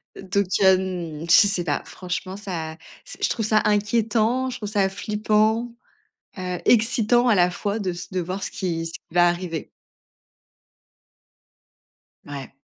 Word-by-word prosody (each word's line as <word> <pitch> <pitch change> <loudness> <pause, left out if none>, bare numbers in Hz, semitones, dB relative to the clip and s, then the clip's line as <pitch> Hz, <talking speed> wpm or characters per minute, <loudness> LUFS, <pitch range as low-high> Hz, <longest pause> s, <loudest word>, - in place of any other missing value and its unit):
Donc, 195 +1 -1
hem, 185 -5 +1
je 205 - +7
sais 195 -3 +2
pas. 145 -4 -1
Franchement, 185 +1 -5
ça, 170 -6 -5 0.3
s - - -9
je - - +2
trouve 225 - -1
ça 215 0 +3
inquiétant, 225 +4 +1
je 250 - -5
trouve 210 -4 -5
ça 200 -2 +1
flippant, 215 +3 0 0.7
heu, 180 -1 -3
excitant 240 +1 +3
à 230 - +5
la 180 -1 +4
fois 205 +4 -3
de 195 -3 -2
s 175 +2 -8
de 185 - -1
voir 185 +3 -4
ce - - -4
qui 165 -3 -3
ce 165 - -8
qui - - -7
va 175 +1 +5
arriver. 175 -2 -3 2.6
Ouais. 140 -3 -7
195 Hz, 150 wpm, -23 LUFS, 175-215 Hz, 2.6 s, je